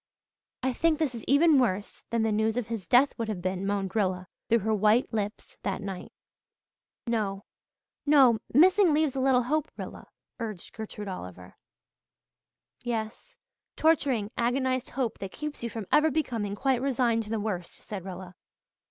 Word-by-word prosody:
"I 260 0 +1
think 325 +3 +2
this 295 -5 0
is 230 -3 -7
even 290 +1 +5
worse 205 -5 -1
than 230 -1 +1
the 220 - +1
news 220 +2 +1
of 235 -2 -2
his 220 -7 -4
death 255 +7 +5
would 230 - -1
have 210 -4 -3
been," 185 +1 -2
moaned 195 -1 -2
Rilla 185 -4 0 0.2
through 230 - +5
her 220 +2 0
white 215 +4 +3
lips, 210 -1 -4
that - - -2
night. 195 -3 -6 0.9
"No 205 -4 -2 0.6
no 270 -6 +5
'missing' 360 - +5
leaves 305 -3 +1
a - - -1
little 260 -1 +3
hope, 300 +4 0
Rilla," - - -8 0.3
urged 215 -6 -6
Gertrude 210 -1 -7
Oliver. 90 - -8 1.3
"Yes 235 - -4 0.4
torturing, 270 -9 +2
agonized 255 +1 0
hope 255 -5 -2
that 195 -1 -6
keeps 300 -1 -6
you 235 - -3
from 225 -2 -6
ever 310 +1 +5
becoming 230 -10 -2
quite 260 +2 +1
resigned 245 -4 +1
to - - -10
the 225 0 -1
worst," 190 -5 -3
said 200 -4 -7
Rilla. 185 -1 -8
230 Hz, 160 wpm, -28 LUFS, 205-265 Hz, 1.3 s, even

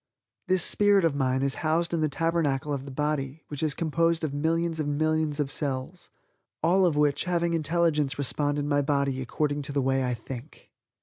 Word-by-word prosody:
This 185 -2 +2
spirit 205 -3 +4
of 165 - +2
mine 130 -1 0
is 140 -1 +1
housed 165 +2 0
in 165 - 0
the 155 - +1
Tabernacle 150 -2 0
of 135 -1 -4
the - - -8
body 150 +1 -2
which 145 -2 -5
is 155 -3 0
composed 165 +1 +1
of 150 -3 -2
millions 165 +2 0
and 145 -1 -1
millions 155 -1 0
of 140 -2 -1
cells, 140 +5 -3 0.5
all 180 +3 +4
of 160 - 0
which 150 0 +2
having 170 -1 0
intelligence 160 -3 +1
respond 145 +1 0
in 145 0 -2
my 145 -1 +2
body 140 -2 0
according 145 +3 -1
to 140 - -4
the 140 - 0
way 135 0 +1
I 125 -1 -1
think. 125 +5 -10
150 Hz, 195 wpm, -27 LUFS, 140-165 Hz, 0.5 s, spirit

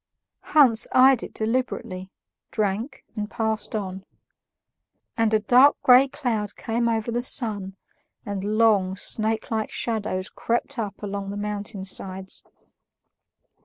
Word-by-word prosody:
Hans 255 -7 +7
eyed 260 -1 +6
it - - -7
deliberately, 220 -5 -3 0.4
drank, 215 +6 -2
and 210 -1 -4
passed 220 -1 -2
on. 190 -2 -4 1.1
And 225 -1 +1
a 215 - +3
dark 250 +7 +5
gray 255 +2 +7
cloud 225 -7 -3
came 235 +1 -1
over 225 0 -1
the 240 +1 -1
sun, 205 -6 0 0.5
and 200 -2 -4
long, 205 -5 +3
snakelike 220 +2 -1
shadows 210 -4 -3
crept 240 +3 -2
up 210 -1 -5
along 200 -1 -4
the 200 - -5
mountain 205 -1 -4
sides. 190 0 -6
220 Hz, 120 wpm, -24 LUFS, 200-235 Hz, 1.1 s, Hans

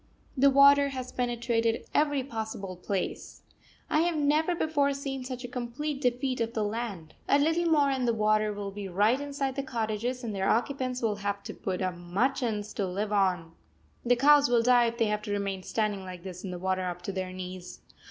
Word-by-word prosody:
The 275 +1 +5
water 280 +1 +6
has 255 -2 -6
penetrated 235 -2 0
every 290 -2 +2
possible 220 -6 -5
place. 185 +1 -4 0.4
I 305 - +2
have 340 +1 +1
never 305 +4 +2
before 290 -4 +1
seen 275 -1 -4
such 255 0 -6
a - - -4
complete 255 +4 -4
defeat 250 0 0
of 230 0 -1
the 215 - +1
land. 205 -7 -4 0.2
A 280 - +6
little 325 +4 +2
more 295 -4 +4
and 260 -2 0
the 235 - +3
water 215 0 +2
will 205 -1 -5
be 200 0 -6
right 210 +8 +2
inside 280 -2 -3
the 275 - -1
cottages, 240 0 -3
and 225 -3 -3
their 195 -1 0
occupants 255 +1 0
will 210 -2 +1
have 200 0 -3
to - - -6
put 185 0 -3
up 185 -1 -1
machans 210 +4 -1
to 200 - 0
live 205 +3 -2
on. 180 -5 +1 0.5
The 245 +1 +4
cows 285 +2 +5
will 235 -1 +3
die 245 0 +5
if 230 0 -4
they 230 - +2
have 210 0 -1
to 210 - -6
remain 200 -2 -2
standing 210 0 -1
like 180 -2 -9
this 185 -1 -8
in 180 -2 -5
water 185 0 0
up 180 0 -5
to 195 - -3
their 185 -1 -4
knees. 185 -1 -8
230 Hz, 200 wpm, -28 LUFS, 200-270 Hz, 0.5 s, water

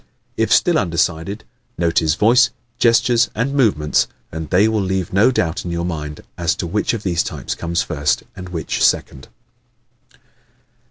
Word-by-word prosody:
If - - 0
still 175 -4 +4
undecided, 85 +3 -1 0.3
note 85 -1 +2
his 80 -2 +1
voice, 120 +5 +4 0.3
gestures 120 +1 +3
and 125 +5 -1
movements 100 - +2 0.2
and 80 -1 -6
they 95 +4 +4
will 110 -1 0
leave 95 -2 -2
no 105 +6 +5
doubt 90 -9 -1
in 90 - -5
your 85 0 -2
mind 75 -3 -5 0.2
as 85 -2 +1
to - - -4
which 105 +6 -1
of 110 - -6
these 85 -3 +1
types - - -4
comes 85 0 -2
first 70 -1 -1
and 90 -1 -8
which 85 -3 -2
second. 65 0 0
90 Hz, 160 wpm, -19 LUFS, 80-110 Hz, 0.3 s, no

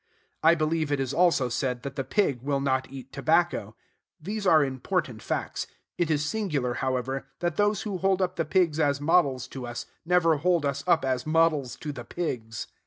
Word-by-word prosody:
I 165 +1 +6
believe 155 -1 0
it 145 - +1
is 135 0 -2
also 170 -6 +3
said 125 +1 -2
that 140 -1 -6
the 135 - -2
pig 140 - 0
will 140 +1 0
not 130 -1 0
eat 135 -1 -10
tobacco. 155 -7 +1 0.4
These 200 +5 -3
are 160 -4 +6
important 135 - -2
facts. - - -3 0.3
It 170 -2 0
is 150 -1 +1
singular, 150 - -1
however, 130 +1 -2
that 175 -2 -1
those 205 -1 +1
who 200 -4 -3
hold 190 0 +2
up 185 -2 0
the 165 - 0
pigs 165 -1 +1
as 145 -2 +2
models 145 -5 +2
to 130 -2 -6
us 120 0 -5 0.2
never 165 -2 +3
hold 170 0 +2
us 140 0 -1
up 165 -5 +3
as 130 +1 -1
models 155 -5 +2
to 150 - -5
the 125 -4 -7
pigs. 115 -8 -4
150 Hz, 190 wpm, -27 LUFS, 130-175 Hz, 0.4 s, I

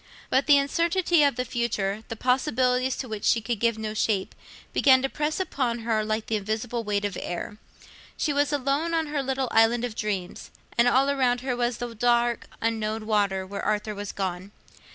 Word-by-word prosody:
But 270 +2 +2
the 290 -1 +7
uncertainty 335 +4 +2
of 285 -3 +3
the 250 0 -2
future, 220 -4 -2
the 225 - -5
possibilities 255 +1 +1
to 260 - -5
which 215 -2 -6
she 230 - +3
could 225 -1 -3
give 230 0 +1
no 215 -1 -4
shape, 210 -3 0 0.4
began 260 -2 +5
to 270 - 0
press 300 +4 -2
upon 255 -10 -1
her 225 -1 0
like 215 0 -2
the 220 - 0
invisible 220 +3 -3
weight 205 -1 -1
of 200 -3 -3
air; 205 +4 -5 0.6
she 300 - 0
was 290 +1 +1
alone 290 +4 0
on 325 -1 +1
her 295 -1 -2
little 265 -1 -1
island 230 +2 +4
of 240 - -5
dreams, 200 -4 -4 0.3
and 235 +1 +4
all 270 +3 +4
around 250 -3 +1
her 255 -1 -2
was 240 -1 -1
the 240 -1 -5
dark 240 +1 +1 0.2
unknown 220 -1 -1
water 200 -3 +1
where 200 +1 -6
Arthur 210 0 -1
was 205 -1 -5
gone. 190 0 -4
235 Hz, 195 wpm, -26 LUFS, 215-265 Hz, 0.6 s, the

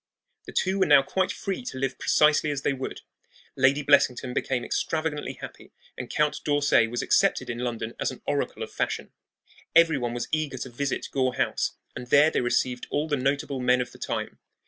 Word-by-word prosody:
The - - -7
two 190 +1 0
were 190 - +3
now 145 -2 +7
quite 185 +6 0
free 195 +4 -4
to 130 - -5
live 135 0 -2
precisely 150 0 +3
as 140 -1 -3
they 145 - +1
would. 130 -1 -6 0.5
Lady 135 +2 +3
Blessington 130 -3 +3
became 125 -1 -1
extravagantly 155 -2 -2
happy, - - -11 0.2
and 125 - -7
Count 150 0 0
d'Orsay 145 -6 +3
was 120 +1 -3
accepted - - +2
in 120 - -6
London 120 -2 -3
as - - 0
an - - -10
oracle - - -2
of - - -8
fashion. - - -3 0.6
Every 165 -3 +5
one 120 -1 -3
was 120 - -3
eager 155 -4 -1
to 130 0 -6
visit 135 +3 -3
Gore 130 -2 0
House, - - 0 0.2
and 125 - -7
there 145 +5 +5
they - - 0
received 125 0 0
all 150 +2 -1
the 150 - +1
notable 140 +1 -1
men 125 0 +3
of 125 - -3
the - - -15
time. - - -4
135 Hz, 195 wpm, -26 LUFS, 125-150 Hz, 0.6 s, now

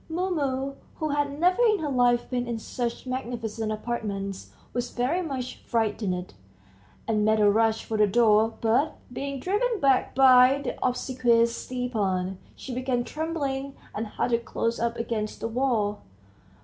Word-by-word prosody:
Mumu, 280 -6 -1 0.2
who 310 - -2
had 285 0 -1
never 365 +7 +3
in 435 -3 +4
her 300 -5 -3
life 245 -2 +3
been 245 -1 -2
in 235 -1 -2
such 240 +2 -4
magnificent 235 -4 -3
apartments, 205 -3 -4 0.2
was 245 0 -2
very 265 +9 0
much 260 -6 -4
frightened, 210 -6 -2 0.7
and 215 -2 +1
made 215 +1 +3
a 210 - +5
rush 225 +1 +2
for 220 - -2
the 210 0 +5
door, 220 +1 +4
but, 235 +7 +2 0.2
being 275 +1 -4
driven 420 - 0
back 270 -4 +2
by 260 0 +7
the - - -3
obsequious 240 -2 +2
Stepan, 200 -7 -2 0.2
she 260 - -7
began 250 -1 -1
trembling, 280 -3 -3 0.2
and 220 +1 -3
huddled 235 +2 -1
close 230 0 -2
up 235 0 0
against 220 -2 -3
the - - -2
wall. 230 -4 0
245 Hz, 150 wpm, -26 LUFS, 225-275 Hz, 0.7 s, by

